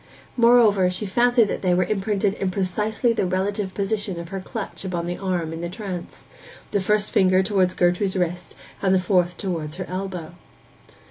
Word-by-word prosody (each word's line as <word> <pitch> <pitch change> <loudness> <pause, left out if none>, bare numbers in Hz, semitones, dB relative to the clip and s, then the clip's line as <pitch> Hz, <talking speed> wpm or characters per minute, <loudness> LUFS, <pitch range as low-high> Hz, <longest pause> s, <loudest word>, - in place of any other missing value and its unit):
Moreover, 230 -6 +5
she 180 +4 -3
fancied 240 +4 +3
that - - -3
they 180 -2 +2
were 180 - +3
imprinted 200 0 0
in 195 -2 -2
precisely 210 +5 0
the 205 -4 0
relative 190 +1 -2
position 200 -2 -2
of 170 -1 -7
her 195 0 -4
clutch 205 +3 -6
upon 175 -3 -3
the 175 +1 -4
arm 180 -4 -2
in 165 - -6
the 170 - -3
trance; 185 -2 -7 0.5
the 200 - +1
first 210 +2 +1
finger 185 -1 +4
towards 190 -2 +1
Gertrude's 180 +2 +1
wrist, 180 0 -2 0.3
and 190 -1 +3
the - - +4
fourth 180 -1 +1
towards 165 -5 -3
her 185 0 -5
elbow. 185 -3 -5
190 Hz, 180 wpm, -23 LUFS, 180-205 Hz, 0.5 s, Moreover